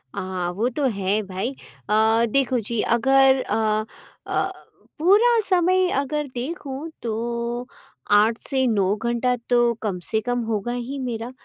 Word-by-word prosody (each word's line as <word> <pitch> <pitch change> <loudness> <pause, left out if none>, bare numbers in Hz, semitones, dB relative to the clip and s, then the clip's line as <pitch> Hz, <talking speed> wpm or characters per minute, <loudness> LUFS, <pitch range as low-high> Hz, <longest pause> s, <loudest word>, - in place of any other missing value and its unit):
हाँ, 185 -2 -3
वो 220 +6 0
तो 275 +3 -2
है 200 +3 +1
भाई। 195 +6 -4 0.4
अ, 220 +2 +3
देखो 260 -2 +2
जी 225 +1 -2 0.2
अगर 270 +1 +4
अ 215 -1 +1 0.4
अ, - - 0 0.5
पूरा 440 +7 +5
समय 370 0 +3
अगर 295 +1 -2
देखूँ 275 +3 -5
तो 235 +2 -3 0.4
8 215 +3 +4
से 265 -2 +1
9 200 -3 +2
घंटा 240 +2 0
तो 240 -1 +3
कम 195 -5 -2
से 220 - 0
कम 245 +2 -1
होगा 220 +1 -2
ही 250 +3 -4
मेरा। 240 -1 -4
240 Hz, 140 wpm, -23 LUFS, 220-270 Hz, 0.5 s, पूरा